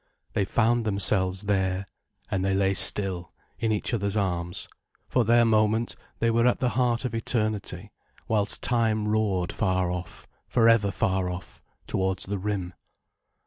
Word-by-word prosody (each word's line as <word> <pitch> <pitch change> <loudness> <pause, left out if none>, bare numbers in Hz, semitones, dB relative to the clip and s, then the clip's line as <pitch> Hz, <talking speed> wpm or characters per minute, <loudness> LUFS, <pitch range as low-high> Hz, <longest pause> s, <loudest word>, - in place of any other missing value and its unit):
They 100 - +1
found 120 +3 +2
themselves 100 -2 +2
there, 95 -1 0 0.5
and 95 -1 0
they 95 0 +1
lay 95 0 +2
still, 95 -3 +1 0.3
in 115 -1 0
each 105 +3 -1
other's 100 -2 -1
arms; 90 -3 -2 0.4
for 125 - +2
their 120 +1 +4
moment 110 +1 +2 0.2
they 115 0 +1
were 115 +1 +3
at 125 - +3
the 125 - 0
heart 120 0 0
of 125 - -3
eternity, 110 -4 -2 0.4
whilst 105 -2 0
time 110 -3 +1
roared 105 -5 0
far 95 -4 0
off, 90 -1 -7 0.2
for 115 -2 +3
ever 115 -3 +4
far 95 -2 0
off, 90 0 -8 0.2
towards 95 0 -1
the 100 0 -3
rim. 95 -3 -3
100 Hz, 150 wpm, -26 LUFS, 95-115 Hz, 0.5 s, their